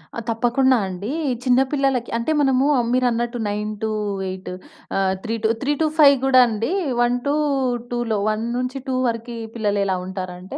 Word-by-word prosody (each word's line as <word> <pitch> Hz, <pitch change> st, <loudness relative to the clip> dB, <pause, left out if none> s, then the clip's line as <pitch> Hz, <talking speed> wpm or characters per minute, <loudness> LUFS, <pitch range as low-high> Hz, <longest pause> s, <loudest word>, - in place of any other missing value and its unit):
ఆ! -, -, -3 dB
తప్పకుండా 245 Hz, +3 st, +2 dB
అండీ. 195 Hz, +6 st, -5 dB, 0.3 s
చిన్న 250 Hz, 0 st, +4 dB
పిల్లలకి 270 Hz, -4 st, 0 dB
అంటే, 235 Hz, +7 st, -1 dB
మనమూ 270 Hz, 0 st, +3 dB
ఆహ్, 240 Hz, -, +1 dB
మీరన్నట్టు 240 Hz, -1 st, 0 dB
9-8 205 Hz, -3 st, -3 dB, 0.5 s
ఆహ్, 190 Hz, -1 st, +2 dB
3 225 Hz, 0 st, -2 dB
టు -, -, +4 dB
3-5 295 Hz, 0 st, +4 dB
గూడా 260 Hz, -1 st, +6 dB
అండీ. 225 Hz, +6 st, -2 dB, 0.3 s
1-2లో, 245 Hz, -3 st, 0 dB
1-2 250 Hz, +4 st, -2 dB
వరికీ 230 Hz, 0 st, -4 dB, 0.2 s
పిల్లలెలా 200 Hz, -3 st, 0 dB
ఉంటారంటే, 185 Hz, -1 st, -6 dB
240 Hz, 120 wpm, -21 LUFS, 210-260 Hz, 0.5 s, గూడా